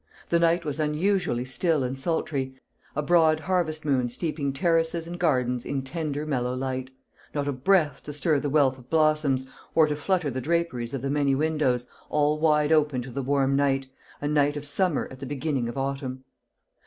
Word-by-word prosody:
The 170 - +3
night 170 0 +2
was 150 0 -3
unusually 155 -3 0
still 155 +2 +1
and 130 +1 -3
sultry, 135 -4 -2 0.4
a 150 - 0
broad 160 -1 +4
harvest 160 -4 -1
moon 130 -4 +1
steeping 145 +2 -2
terraces 165 +3 +1
and 175 +1 -7
gardens 125 -7 +1
in 135 -1 -3
tender 150 0 -3
mellow 125 -4 -1
light; 130 0 -3 0.5
not 145 -1 -1
a - - +1
breath 145 +1 +2
to 150 - -5
stir 150 0 +1
the 145 - -2
wealth 135 -3 +3
of 125 0 -17
blossoms, 155 -4 +2 0.3
or 160 - +6
to 150 -1 -1
flutter 160 0 0
the 130 +1 -3
draperies 145 -5 -1
of 135 - -5
the 135 - -1
many 140 -2 +2
windows, 145 -5 +1 0.2
all 150 0 +2
wide 150 -1 +3
open 150 -5 +2
to 125 - -9
the 140 +3 -3
warm 135 0 +1
night 135 -1 +1 0.3
a 145 - -2
night 145 0 +2
of 145 - -6
summer 170 +2 0
at 130 - -10
the 135 - -6
beginning 140 -3 -2
of 120 - -7
autumn. 135 -1 -3
145 Hz, 190 wpm, -26 LUFS, 130-160 Hz, 0.5 s, or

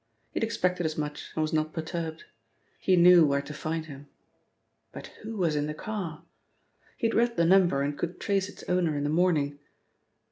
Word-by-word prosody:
He - - -2
had - - -2
expected 180 -6 0
as 155 - -5
much 150 -1 -4
and 155 - +1
was 155 - -2
not 155 0 0
perturbed. 160 0 -4 0.6
He 185 - +3
knew 175 -1 +7
where 140 -1 +2
to 150 - -8
find 160 +2 -3
him. 145 -2 -11 0.8
But - - -9
who 220 0 -6
was 170 -5 +1
in 145 0 0
the 150 - -4
car? 170 -4 -5 0.7
He - - -2
had 225 - +2
read 235 0 +2
the 170 - +4
number 175 -6 +4
and 145 +1 -2
could 175 +4 -4
trace 195 -1 0
its - - -12
owner 175 -4 +1
in 145 - -2
the 145 - 0
morning. 155 -4 +1
165 Hz, 200 wpm, -28 LUFS, 150-180 Hz, 0.8 s, knew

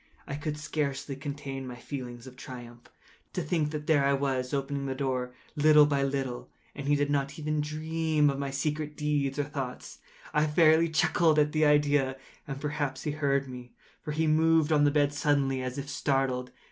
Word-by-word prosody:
I - - -6
could 150 0 -4
scarcely 145 -2 -3
contain 135 -1 -6
my 125 - -6
feelings 120 -2 -7
of 130 -1 -11
triumph. 120 -2 -10 0.4
To - - -2
think 150 0 0
that 150 -1 -5
there 150 -3 +3
I 140 0 +3
was, 135 -2 -1
opening 140 0 -2
the 135 - -2
door, 130 -2 -2 0.2
little 150 0 +6
by 140 -1 +1
little, 135 -3 -2 0.2
and 140 -1 -6
he 145 - +4
not 140 +1 -1
even 155 -1 -1
to 150 - -4
dream 155 -1 +1
of 140 - -5
my 140 -1 -2
secret 150 +2 -2
deeds 145 -2 0
or 145 - +1
thoughts. 140 -3 -6 0.3
I 150 +1 +3
fairly 160 +1 +4
chuckled 160 0 +3
at 150 0 +3
the 155 0 +2
idea; 145 -2 +3 0.3
and 135 -1 -5
perhaps 145 -3 -3
he 150 - -1
heard 140 -2 0
me; 125 -1 -9 0.3
for 150 - -5
he 160 +2 0
moved 160 0 +3
on 145 -1 +4
the - - +5
bed 145 0 +2
suddenly, 140 -3 +1
as 130 +1 -4
if 140 0 -4
startled. 135 -3 0
145 Hz, 190 wpm, -29 LUFS, 135-150 Hz, 0.4 s, little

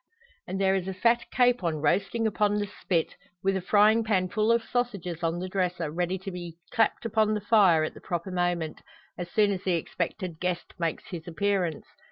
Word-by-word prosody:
And 190 +2 -3
there 190 -1 +3
is 190 -1 -1
a 190 - -4
fat 235 +4 +2
capon 245 -10 +2
roasting 195 +9 +1
upon 210 -1 +2
the 205 0 0
spit, 180 -4 -2 0.3
with 195 0 +2
a 190 - -1
frying 215 +4 +4
pan 190 -4 +1
full 215 +3 +2
of 230 0 +3
sausages 200 -9 -2
on 165 0 0
the 185 +1 -4
dresser, 180 -4 -1
ready 180 +3 -1
to 190 +1 -7
be 175 -2 -7
clapped 225 0 +1
upon 215 -1 +2
the 210 - -2
fire 195 -7 +5
at 155 - -3
the - - -13
proper 175 +2 -3
moment 175 -3 -1 0.3
as 175 -1 -6
soon 210 +2 +3
as 190 -1 -3
the 185 - +1
expected 170 +1 -3
guest 180 -1 -3
makes 165 -2 -1
his 170 -2 -6
appearance. 180 -1 -1
185 Hz, 200 wpm, -27 LUFS, 175-210 Hz, 0.3 s, fire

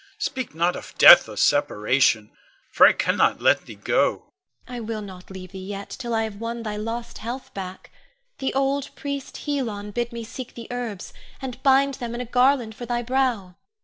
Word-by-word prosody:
Speak 260 - -4
not 170 +2 +1
of - - -9
death - - +9
or - - -9
separation, 110 0 +2 0.4
for - - +8
I - - +6
cannot - - +1
let - - +3
thee - - -9
go. - - 0 0.4
Ione. 245 - -7
I - - -4
will 220 -1 -4
not 185 -2 -11
leave 185 -1 -9
thee 190 - -8
yet, 200 +1 -7
till 240 -3 -5
I 225 - +1
have 215 -2 -5
won 230 0 -4
thy 215 -2 -4
lost 230 +2 -5
health 245 +4 -6
back. 185 -1 -8 0.5
The 265 - -1
old 275 0 0
priest, 280 -1 -6
Helon, 225 -9 -3
bid 240 +3 -2
me 235 -1 -6
seek 250 +2 -8
the 235 - -8
herbs, 235 -6 -5 0.3
and 260 -2 -7
bind 275 0 +4
them 235 -1 -4
in 240 - -3
a - - -4
garland 250 -1 +2
for 240 +2 -8
thy 240 0 -1
brow. 240 -8 -1
235 Hz, 195 wpm, -24 LUFS, 200-255 Hz, 0.5 s, death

